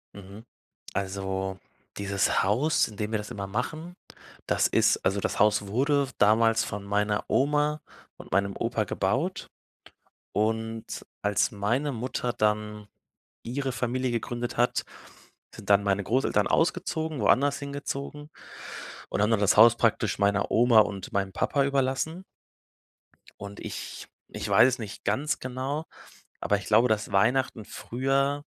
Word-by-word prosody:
Mhm. 100 Hz, +3 st, -11 dB, 0.5 s
Also, 95 Hz, -1 st, -3 dB, 0.4 s
dieses 100 Hz, -1 st, +1 dB
Haus, 125 Hz, +11 st, +2 dB
in 105 Hz, -, -12 dB
dem 105 Hz, +1 st, -3 dB
wir 110 Hz, -, +1 dB
das 105 Hz, -, -8 dB
immer 100 Hz, -1 st, -5 dB
machen, 155 Hz, -, -4 dB, 0.5 s
das -, -, +2 dB
ist -, -, +3 dB
also, 95 Hz, +2 st, +2 dB
das -, -, -2 dB
Haus 105 Hz, -1 st, +3 dB
wurde 140 Hz, +6 st, +1 dB
damals 115 Hz, +2 st, +4 dB
von 105 Hz, 0 st, -5 dB
meiner 105 Hz, +1 st, 0 dB
Oma 150 Hz, +2 st, +1 dB, 0.4 s
und -, -, -13 dB
meinem 100 Hz, +2 st, +1 dB
Opa 115 Hz, -1 st, -1 dB
gebaut 130 Hz, -, -1 dB, 0.8 s
und 110 Hz, +1 st, -2 dB, 0.2 s
als 105 Hz, +4 st, +1 dB
meine 115 Hz, +8 st, -1 dB
Mutter 125 Hz, 0 st, -3 dB
dann 105 Hz, 0 st, -1 dB, 0.6 s
ihre 130 Hz, +3 st, -3 dB
Familie 125 Hz, +1 st, -1 dB
gegründet 120 Hz, +1 st, -3 dB
hat, 120 Hz, +1 st, +2 dB, 0.7 s
sind 105 Hz, -3 st, -11 dB
dann 100 Hz, 0 st, +5 dB
meine 100 Hz, 0 st, +1 dB
Großeltern 125 Hz, +7 st, +1 dB
ausgezogen, 160 Hz, -3 st, 0 dB
woanders 140 Hz, +6 st, +3 dB
hingezogen 140 Hz, +1 st, -6 dB, 0.8 s
und -, -, 0 dB
haben 105 Hz, -, +2 dB
dann 110 Hz, -3 st, +2 dB
das 105 Hz, 0 st, +3 dB
Haus 115 Hz, +2 st, +8 dB
praktisch 110 Hz, -4 st, +1 dB
meiner 100 Hz, 0 st, +1 dB
Oma 115 Hz, -1 st, +6 dB
und 100 Hz, -2 st, -2 dB
meinem 95 Hz, -1 st, -1 dB
Papa 140 Hz, +8 st, +1 dB
überlassen. 140 Hz, +5 st, -1 dB, 1.2 s
Und 100 Hz, 0 st, -8 dB
ich -, -, -7 dB, 0.2 s
ich -, -, -5 dB
weiß -, -, +6 dB
es 130 Hz, -, -2 dB
nicht 105 Hz, -3 st, -8 dB
ganz 150 Hz, +3 st, 0 dB
genau, 130 Hz, +5 st, -4 dB, 0.6 s
aber 105 Hz, -, +1 dB
ich 100 Hz, -, -9 dB
glaube, 115 Hz, +3 st, +5 dB
dass 110 Hz, -2 st, -1 dB
Weihnachten 115 Hz, +2 st, +1 dB
früher, 135 Hz, +5 st, -1 dB
115 Hz, 140 wpm, -27 LUFS, 100-135 Hz, 1.2 s, Haus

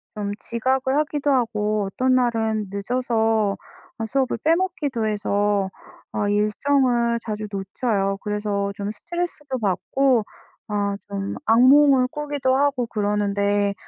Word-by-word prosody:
좀 205 Hz, -1 st, -3 dB
지각을 260 Hz, +3 st, 0 dB
하기도 295 Hz, -1 st, 0 dB
하고 215 Hz, -5 st, +1 dB
어떤 255 Hz, 0 st, +2 dB
날은 220 Hz, -4 st, +1 dB
늦어서 220 Hz, -1 st, 0 dB, 0.4 s
어 225 Hz, -, -3 dB
수업을 265 Hz, 0 st, 0 dB
빼먹기도 315 Hz, -8 st, 0 dB
해서 205 Hz, -2 st, 0 dB, 0.4 s
아 205 Hz, -, -1 dB
일정을 235 Hz, +3 st, +2 dB
자주 215 Hz, -1 st, -4 dB
놓쳐요. 195 Hz, 0 st, -1 dB
그래서 205 Hz, -1 st, -2 dB
좀 200 Hz, +1 st, -4 dB
스트레스도 310 Hz, -2 st, -4 dB
받고 230 Hz, +5 st, +1 dB, 0.5 s
아 200 Hz, -1 st, 0 dB
좀 200 Hz, -1 st, -4 dB
악몽을 260 Hz, +3 st, +6 dB
꾸기도 290 Hz, -3 st, -1 dB
하고 275 Hz, -3 st, +1 dB
그러는데 205 Hz, -1 st, 0 dB
225 Hz, 260 characters per minute, -23 LUFS, 205-265 Hz, 0.5 s, 악몽을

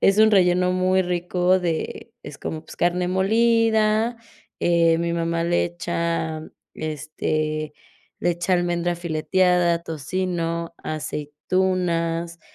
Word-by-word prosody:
es 195 Hz, +2 st, +4 dB
un 220 Hz, 0 st, +6 dB
relleno 180 Hz, -1 st, +4 dB
muy 185 Hz, +1 st, +2 dB
rico 180 Hz, +1 st, +1 dB
de 165 Hz, -3 st, -3 dB
es -, -, -9 dB
como, 155 Hz, 0 st, -5 dB
pues -, -, -11 dB
carne 175 Hz, +1 st, +1 dB
molida, 220 Hz, +3 st, +2 dB, 0.4 s
eh, 170 Hz, -1 st, +3 dB
mi 170 Hz, 0 st, -1 dB
mamá 165 Hz, 0 st, -1 dB
le 175 Hz, 0 st, +2 dB
echa, 170 Hz, -2 st, -2 dB, 0.3 s
este, 155 Hz, 0 st, -3 dB, 0.5 s
le 175 Hz, -, +1 dB
echa 175 Hz, +2 st, 0 dB
almendra 175 Hz, 0 st, 0 dB
fileteada, 175 Hz, +1 st, +2 dB
tocino, 170 Hz, +1 st, -3 dB
aceitunas, 170 Hz, +2 st, -1 dB
175 Hz, 110 wpm, -23 LUFS, 165-185 Hz, 0.5 s, un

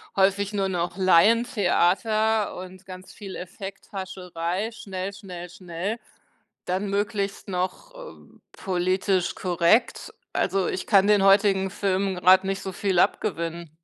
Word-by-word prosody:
häufig 200 Hz, +1 st, +2 dB
nur 195 Hz, -1 st, 0 dB
noch 175 Hz, 0 st, -2 dB
Laientheater 215 Hz, +2 st, +3 dB
und 185 Hz, +1 st, -10 dB
ganz 185 Hz, 0 st, -10 dB
viel 195 Hz, -3 st, -9 dB
Effekthascherei, 190 Hz, -1 st, -5 dB
schnell 195 Hz, -4 st, -6 dB
schnell 180 Hz, -3 st, -9 dB
schnell, 180 Hz, +5 st, -5 dB, 0.7 s
dann 190 Hz, +3 st, -1 dB
möglichst 200 Hz, 0 st, -2 dB
noch, 190 Hz, -, -3 dB
äh, -, -, -11 dB, 0.3 s
politisch 185 Hz, 0 st, 0 dB
korrekt. 175 Hz, +5 st, +1 dB, 0.2 s
Also, 195 Hz, -2 st, +1 dB
ich 185 Hz, -, -3 dB
kann 200 Hz, -2 st, +5 dB
den 205 Hz, -2 st, +4 dB
heutigen 195 Hz, -1 st, +4 dB
Film 195 Hz, 0 st, -1 dB
grad 185 Hz, +1 st, +5 dB
nicht 195 Hz, 0 st, -2 dB
so 190 Hz, -, -5 dB
viel 190 Hz, 0 st, -1 dB
abgewinnen. 170 Hz, -5 st, -1 dB
190 Hz, 120 wpm, -25 LUFS, 180-200 Hz, 0.7 s, kann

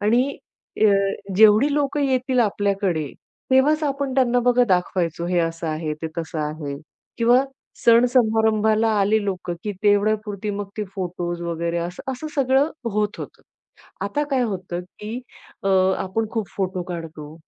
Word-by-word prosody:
आणि 240 Hz, +7 st, +2 dB, 0.4 s
अ, 215 Hz, -, +6 dB, 0.5 s
जेवढी 220 Hz, +7 st, +6 dB
लोकं 290 Hz, 0 st, 0 dB
येतील 260 Hz, -1 st, +1 dB
आपल्याकडे 195 Hz, -, 0 dB, 0.4 s
तेव्हाच 290 Hz, +4 st, +4 dB
आपण 275 Hz, -2 st, -2 dB
त्यांना 250 Hz, -2 st, +3 dB
बघा 245 Hz, 0 st, +4 dB
दाखवायचो, 175 Hz, -2 st, 0 dB
हे 180 Hz, 0 st, +1 dB
असं 165 Hz, 0 st, -1 dB
आहे, 155 Hz, 0 st, -2 dB
ते 160 Hz, -, -1 dB
तसं 165 Hz, -1 st, -4 dB
आहे. 150 Hz, -2 st, -4 dB, 0.4 s
किंवा 245 Hz, +3 st, +4 dB, 0.4 s
सण-समारंभाला 220 Hz, -2 st, +4 dB
आले 210 Hz, +2 st, +2 dB
लोकं, 185 Hz, -3 st, -3 dB
की 210 Hz, -, -2 dB
तेवढ्यापुरती 210 Hz, 0 st, +1 dB
मग 200 Hz, -1 st, -4 dB
ते 210 Hz, -, -2 dB
फोटोज 175 Hz, -2 st, -4 dB
वगैरे 170 Hz, 0 st, -2 dB
असं, 175 Hz, +1 st, -5 dB
असं 260 Hz, +5 st, -6 dB
सगळं 275 Hz, +2 st, +2 dB, 0.2 s
होत 210 Hz, +1 st, -1 dB
होतं. -, -, -9 dB, 0.6 s
आता 290 Hz, +9 st, -1 dB
काय 260 Hz, -2 st, +2 dB
होतं, 185 Hz, -5 st, -3 dB, 0.2 s
की 220 Hz, +4 st, -5 dB, 0.4 s
अ, 195 Hz, -, 0 dB, 0.3 s
आपण 220 Hz, +4 st, -2 dB
खूप 220 Hz, -4 st, -2 dB
फोटो 185 Hz, -2 st, -2 dB
काढतो, 160 Hz, -3 st, -7 dB
210 Hz, 140 wpm, -22 LUFS, 175-245 Hz, 0.6 s, अ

